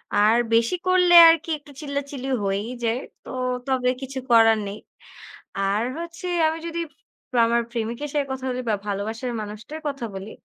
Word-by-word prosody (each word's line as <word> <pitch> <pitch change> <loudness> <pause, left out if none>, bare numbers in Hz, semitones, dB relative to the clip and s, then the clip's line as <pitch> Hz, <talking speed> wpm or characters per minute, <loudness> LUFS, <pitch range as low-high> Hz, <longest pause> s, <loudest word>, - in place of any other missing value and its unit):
আর 215 +3 +5 0.2
বেশি 230 +8 +3
করলে 360 -1 +4 0.2
আরকি 330 0 +2
একটু 290 0 -17
চিল্লাচিল্লি 280 -2 -4
হয়েই 200 +4 -2
যায়। 230 +2 +1 0.2
তো - - -12 0.4
তবে 255 -1 +1
কিছু 265 0 -5
করার 225 -1 +6
নেই। 200 +2 -6 0.8
আর 195 +2 +1 0.2
হচ্ছে 340 +1 -7 0.2
আমি 320 +1 -1
যদি 335 0 -4 0.7
আমার 235 +1 +2
প্রেমিকের 235 +5 -3
সাথে 290 -1 +1
কথা 265 0 -4
বলি 250 0 -2
বা 215 - +2
ভালোবাসার 220 +5 -3
মানুষটার 215 +10 -8
কথা 275 -4 -3
বলি, 195 +3 -7
250 Hz, 155 wpm, -23 LUFS, 220-290 Hz, 0.8 s, করার